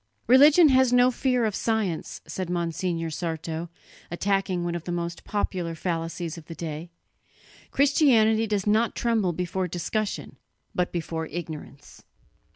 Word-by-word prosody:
"Religion 290 +6 +7
has 260 -2 +4
no 245 +1 +5
fear 250 -1 +1
of 215 - 0
science," 210 -7 -2
said 185 -2 -5
Monsignor 170 -1 -2
Sarto, 165 0 -4 0.4
attacking 190 0 0
one 175 0 -2
of 170 -1 -5
the 175 - -3
most 170 0 -4
popular 180 -5 -2
fallacies 165 0 -3
of 155 - -16
the 165 - -8
day; 160 +1 -6 0.8
"Christianity 235 -7 +4
does 205 -2 -1
not 220 +2 +2
tremble 225 -6 +1
before 180 +2 -2
discussion, 200 +5 -3 0.4
but 180 0 0
before 160 -1 -3
ignorance. 155 -3 -8
180 Hz, 135 wpm, -26 LUFS, 165-220 Hz, 0.8 s, Religion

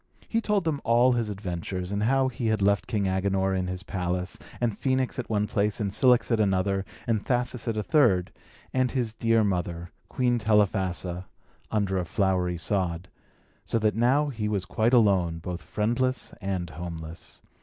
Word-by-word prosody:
He 230 - 0
told 210 -3 +1
them 155 -4 -1
all 120 +2 +4
his 120 -3 0
adventures, 90 -2 -4
and 100 0 -1
how 135 +4 +3
he 120 -2 -3
had 110 -1 +1
left 100 -1 +2
King 105 -4 0
Agenor 95 0 +1
in 95 -1 -1
his 90 +1 -5
palace, 90 -1 -3 0.2
and 120 -4 0
Phœnix 130 +2 0
at 125 - -4
one 105 -1 +1
place, 105 +1 0
and 100 -3 -1
Cilix 125 +1 +4
at 115 - +3
another, 95 -1 +1 0.2
and 110 -3 0
Thasus 125 -1 -1
at 115 -2 -1
a 105 - 0
third, 110 - +3 0.4
and 130 -1 +2
his 120 -4 -1
dear 115 0 +2
mother, 90 -3 -2 0.2
Queen 125 -2 +1
Telephassa, 95 -4 +1 0.4
under 100 -3 0
a 90 - -2
flowery 90 -1 0
sod; 90 0 -1 0.5
so - - -1
that 110 -1 +2
now 135 +6 +3
he 110 -5 -3
was 100 -3 -1
quite 115 +3 +2
alone, 95 -8 +3
both 90 +1 -5
friendless 120 +4 -1
and 90 -4 -3
homeless. 80 0 -8
105 Hz, 175 wpm, -27 LUFS, 90-120 Hz, 0.5 s, all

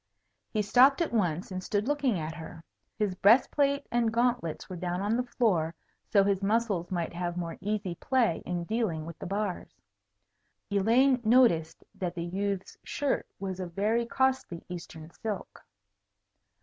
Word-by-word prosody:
He 215 -2 0
stopped 255 +6 +5
at 335 -7 -1
once, 180 -5 0
and 185 0 -4
stood 205 +3 -1
looking 280 -7 +1
at 160 0 -4
her. 165 0 -9 0.3
His 210 -3 0
breast 215 +7 +5
plate 280 -1 +1
and 235 -2 +2
gauntlets 235 -8 0
were 185 - -6
down 180 0 -2
on 205 +3 0
the 250 - +2
floor, 190 -10 0 0.3
so 200 -2 +5
his 195 -1 +1
muscles 205 -4 0
might 175 -3 -2
have 175 0 -3
more 170 -2 -3
easy 205 -2 -2
play 235 -2 +1
in 175 -1 -3
dealing 180 -6 -1
with 165 -1 -9
the - - -6
bars. 200 -1 -3 0.9
Elaine 240 +6 +4
noticed 215 -9 +3
that 180 -2 -4
the 170 -1 -3
youth's 195 +2 -3
shirt 285 -1 -1
was 190 -1 -4
of 180 -2 -5
very 225 +4 +1
costly 260 -10 0
Eastern 165 -2 -8
silk. 210 +1 -6
200 Hz, 160 wpm, -29 LUFS, 175-235 Hz, 0.9 s, stopped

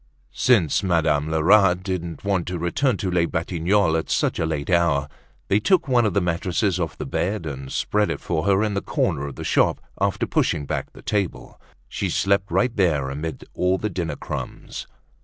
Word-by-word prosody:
Since 100 - +3
Madame 80 -5 +1
Lerat 90 +3 +4
didn't 90 -4 -4
want 95 -3 0
to 90 0 -3
return 100 - 0
to 95 -1 -2
Les 85 -1 +2
Batignolles 85 +2 +1
at - - -7
such - - 0
a 80 - +1
late 75 0 -3
hour, 85 -5 +2 0.4
they 100 - +3
took 175 - +2
one 120 -4 +3
of 105 - -2
the - - +5
mattresses 90 +2 0
off 80 -4 -3
the - - -5
bed 95 -1 -2
and 70 -3 -6
spread 105 0 0
it - - -2
for 85 +1 -2
her 100 +1 +3
in 105 -2 -1
a 100 - 0
corner 70 - -1
of 70 - -8
the - - -6
shop, - - +2 0.2
after - - +1
pushing 70 - 0
back - - -3
the - - -14
table. 100 -4 -3 0.3
She - - -3
slept 100 0 +1
right 125 -1 +1
there 75 -9 +1
amid 80 +3 -5
all 90 +1 +1
the 105 +2 -3
dinner 80 -5 -3
crumbs. - - -6
90 Hz, 195 wpm, -23 LUFS, 80-100 Hz, 0.4 s, the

